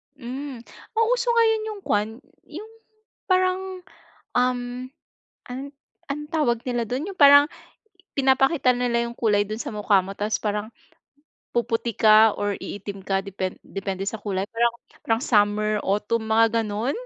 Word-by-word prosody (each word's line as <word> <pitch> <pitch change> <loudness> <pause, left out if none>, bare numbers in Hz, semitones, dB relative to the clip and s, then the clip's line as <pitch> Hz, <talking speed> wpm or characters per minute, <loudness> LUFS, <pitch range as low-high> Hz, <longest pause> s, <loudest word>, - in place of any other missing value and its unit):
Hmm. 260 -1 -7 0.3
Ang 450 0 +3
uso - - 0
ngayon 445 -1 +4
'yung 420 -2 -6
kuwan, 210 +1 +1 0.4
'yung 425 +8 -9 0.6
parang, 370 0 0 0.5
um, 250 0 +2 0.9
ano 250 +1 -5 0.4
anong 295 +1 -5
tawag 265 -8 +1
nila 240 -1 0
do'n 260 - -3
'yung 390 - -8
parang 285 -1 +8 0.7
pinapakita 270 0 +3
nila 245 -1 0
yung 235 - -5
kulay 205 -3 +2
do'n 215 +2 -6
sa - - -4
mukha 210 -2 +3
mo 195 +2 -8
tas 210 +1 -1
parang 210 +1 -3 0.8
puputi 235 -1 -1
ka 215 0 +6
or 205 0 -1
iitim 200 0 -7
ka 195 0 0
depen 190 -1 -4
depende 195 -1 -4
sa 205 +1 -4
kulay? 195 -2 -2
Parang 235 +1 +2 0.3
parang 225 +1 +1
summer 210 -1 +2
autumn 210 +3 0
mga 225 +1 +3
gano'n? 215 +6 -2
230 Hz, 145 wpm, -24 LUFS, 210-280 Hz, 0.9 s, parang